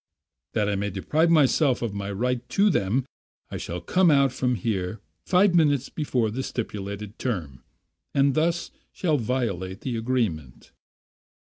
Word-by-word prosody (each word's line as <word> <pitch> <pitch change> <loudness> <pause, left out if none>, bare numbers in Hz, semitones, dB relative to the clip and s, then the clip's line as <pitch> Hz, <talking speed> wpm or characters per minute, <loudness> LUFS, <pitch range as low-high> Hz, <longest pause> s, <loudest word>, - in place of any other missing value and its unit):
That 105 -2 +1
I 105 - 0
may 100 +1 -1
deprive 150 - +1
myself 145 -4 +3
of 115 -4 -2
my 100 0 -4
right 125 +4 -2
to 205 +1 +3
them, 120 - +1 0.5
I - - -3
shall 85 - -5
come 180 - +3
out 140 -3 +4
from 125 -1 0
here 105 -4 -2 0.3
five 185 +1 +4
minutes 145 -5 +3
before 125 -8 -1
the 130 +5 -3
stipulated 105 -4 -5
term, 80 - -4 0.5
and 140 0 +4
thus 170 +3 0 0.2
shall 160 -5 0
violate 105 -6 -2
the 125 -3 -3
agreement." 110 - -2
120 Hz, 145 wpm, -25 LUFS, 100-140 Hz, 0.5 s, out